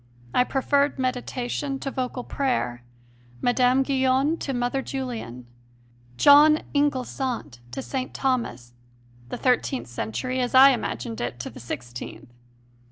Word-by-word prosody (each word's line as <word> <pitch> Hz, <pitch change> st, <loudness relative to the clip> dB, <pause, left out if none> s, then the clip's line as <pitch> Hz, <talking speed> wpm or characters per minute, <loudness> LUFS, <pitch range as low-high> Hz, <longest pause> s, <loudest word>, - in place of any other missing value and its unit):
I 250 Hz, -, +4 dB
preferred 280 Hz, +2 st, +1 dB
meditation 255 Hz, +1 st, -2 dB
to 275 Hz, -, -3 dB
vocal 250 Hz, -1 st, -3 dB
prayer, 240 Hz, -, -2 dB, 0.6 s
Mme. 250 Hz, -, +3 dB
Guyon 265 Hz, +2 st, +2 dB
to 275 Hz, -, -4 dB
Mother 245 Hz, +1 st, -1 dB
Julian, 235 Hz, -, -5 dB, 0.7 s
"John 300 Hz, -, +7 dB
Inglesant" 260 Hz, -, -1 dB
to 120 Hz, -, -5 dB
St. 260 Hz, -2 st, -4 dB
Thomas, 235 Hz, -, -2 dB, 0.6 s
the -, -, -4 dB
thirteenth 255 Hz, +1 st, 0 dB
century 120 Hz, -, -3 dB
as 250 Hz, 0 st, -1 dB
I 270 Hz, +1 st, +9 dB
imagined 115 Hz, -, -3 dB
it 120 Hz, 0 st, -4 dB
to -, -, -6 dB
the -, -, -11 dB
sixteenth. 120 Hz, 0 st, -8 dB
255 Hz, 120 wpm, -25 LUFS, -, 0.7 s, I